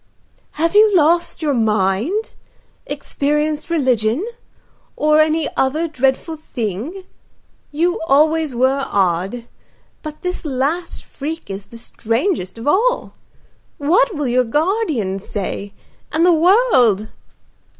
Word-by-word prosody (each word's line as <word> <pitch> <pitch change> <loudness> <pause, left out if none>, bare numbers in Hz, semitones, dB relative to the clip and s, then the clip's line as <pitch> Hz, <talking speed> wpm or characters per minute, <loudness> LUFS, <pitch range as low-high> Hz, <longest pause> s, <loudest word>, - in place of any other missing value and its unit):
"Have 330 +2 0
you 420 -1 +5
lost 335 +1 +2
your 295 -2 +1
mind? 220 - 0 0.6
experienced 300 +2 -2
religion? 255 - +1 0.7
or 305 0 +3
any 310 0 +2
other 305 +6 0
dreadful 270 +2 -1
thing? 255 - -5 0.7
You 340 +4 0
always 310 -1 +2
were 260 +3 +2
odd, 195 +5 0 0.6
but 305 -1 -9
this 360 0 -3
last 295 +4 -2
freak 305 -5 -6
is 195 +1 -7
the 230 - -12
strangest 230 - -2
of 230 - -7
all. 485 +11 +1 0.6
What 370 +9 +2
will 295 -2 -2
your 250 +1 +2
guardian 295 - -1
say, 200 0 -5 0.4
and 320 +3 +2
the 355 - +5
world?" 310 - +3
295 Hz, 110 wpm, -19 LUFS, 230-330 Hz, 0.7 s, you